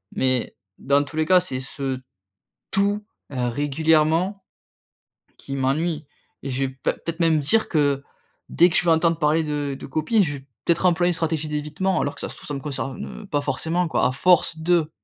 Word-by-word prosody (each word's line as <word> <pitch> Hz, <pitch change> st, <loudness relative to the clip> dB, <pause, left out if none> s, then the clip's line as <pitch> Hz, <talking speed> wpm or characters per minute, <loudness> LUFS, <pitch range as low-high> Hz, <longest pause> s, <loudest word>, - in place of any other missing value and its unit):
mais, 130 Hz, -2 st, +1 dB, 0.2 s
dans 140 Hz, +1 st, +3 dB
tous 145 Hz, +2 st, -10 dB
les 160 Hz, -, +2 dB
cas, 185 Hz, +3 st, +6 dB
c'est 155 Hz, -8 st, -4 dB
ce 130 Hz, 0 st, -4 dB, 0.7 s
tout, 205 Hz, +1 st, +1 dB, 0.3 s
heu, 125 Hz, -2 st, -1 dB
régulièrement, 160 Hz, -, +1 dB, 0.9 s
qui 135 Hz, -, -6 dB
m'ennuie 150 Hz, +4 st, 0 dB, 0.4 s
et 135 Hz, -, -4 dB
je 135 Hz, +1 st, -1 dB
vais 130 Hz, -, -2 dB
p 130 Hz, -, -14 dB, 0.2 s
peut-être 165 Hz, +1 st, -6 dB
même 165 Hz, -2 st, +3 dB
dire 215 Hz, +10 st, +2 dB
que, 145 Hz, -3 st, +1 dB, 0.5 s
dès 175 Hz, +2 st, +5 dB
que -, -, -3 dB
je -, -, +3 dB
vais 170 Hz, -, +4 dB
entendre 165 Hz, 0 st, +3 dB
parler 155 Hz, +1 st, +2 dB
de 145 Hz, -2 st, -2 dB
de -, -, -8 dB
copines, 155 Hz, -, +2 dB
je 150 Hz, -4 st, -2 dB
vais, 135 Hz, -, -15 dB, 0.2 s
peut-être, 170 Hz, +2 st, +2 dB
employer 175 Hz, 0 st, +3 dB
une -, -, +1 dB
stratégie 160 Hz, -2 st, -1 dB
d'évitement, 150 Hz, +5 st, -1 dB
alors 145 Hz, -, -1 dB
que, -, -, -8 dB
ça -, -, -4 dB
se -, -, -9 dB
trouve, -, -, -11 dB
ça 145 Hz, -, -4 dB
me 140 Hz, -, -3 dB
concerne, 135 Hz, +4 st, -5 dB
heu, -, -, -11 dB
pas 145 Hz, -5 st, 0 dB
forcément, 160 Hz, +6 st, -1 dB
quoi, -, -, +1 dB
à -, -, 0 dB
force 165 Hz, +2 st, +3 dB
de. 165 Hz, -1 st, +2 dB
155 Hz, 205 wpm, -23 LUFS, 140-170 Hz, 0.9 s, cas